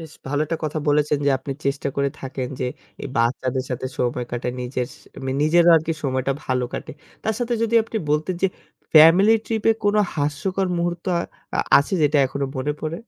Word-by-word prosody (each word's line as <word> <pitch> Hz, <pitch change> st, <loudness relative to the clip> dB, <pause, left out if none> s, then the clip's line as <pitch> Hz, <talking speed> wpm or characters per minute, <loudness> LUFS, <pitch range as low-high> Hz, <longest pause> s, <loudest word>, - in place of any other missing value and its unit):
বেশ 160 Hz, -2 st, -10 dB
ভালো 145 Hz, +2 st, -1 dB
একটা 165 Hz, +1 st, -2 dB
কথা 155 Hz, +1 st, -2 dB
বলেছেন 150 Hz, 0 st, +2 dB
যে -, -, +5 dB
আপনি 135 Hz, +1 st, -5 dB
চেষ্টা 140 Hz, 0 st, -1 dB
করে 140 Hz, 0 st, +2 dB
থাকেন 130 Hz, -1 st, -4 dB
যে -, -, 0 dB, 0.4 s
এই -, -, -4 dB
বাচ্চাদের 130 Hz, +2 st, 0 dB
সাথে 125 Hz, +1 st, -3 dB
সময় 125 Hz, 0 st, -1 dB
কাটে 120 Hz, 0 st, -2 dB
নিজের 125 Hz, 0 st, -3 dB, 0.5 s
নিজেরও 170 Hz, +3 st, +5 dB
আরকি 160 Hz, +1 st, 0 dB
সময়টা 130 Hz, 0 st, 0 dB
ভালো 125 Hz, -1 st, 0 dB
কাটে। -, -, -5 dB, 0.3 s
তার 220 Hz, -, 0 dB
সাথে 240 Hz, -1 st, -1 dB
যদি 230 Hz, 0 st, 0 dB
আপনি 225 Hz, 0 st, -6 dB
বলতেন 155 Hz, +5 st, 0 dB
যে -, -, +6 dB, 0.5 s
ফ্যামিলি 165 Hz, +8 st, +8 dB
ট্রিপ 220 Hz, -2 st, -2 dB
এ -, -, +6 dB
কোন 205 Hz, 0 st, +3 dB, 0.2 s
হাস্যকর 160 Hz, +6 st, -1 dB
মুহূর্ত 175 Hz, 0 st, -2 dB, 0.5 s
আ -, -, +3 dB, 0.2 s
আছে 140 Hz, +7 st, -1 dB
যেটা 150 Hz, 0 st, +3 dB
এখনো 140 Hz, +2 st, -3 dB
মনে 145 Hz, +3 st, -1 dB
পড়ে? 155 Hz, +1 st, -3 dB
150 Hz, 185 wpm, -22 LUFS, 130-170 Hz, 0.5 s, ফ্যামিলি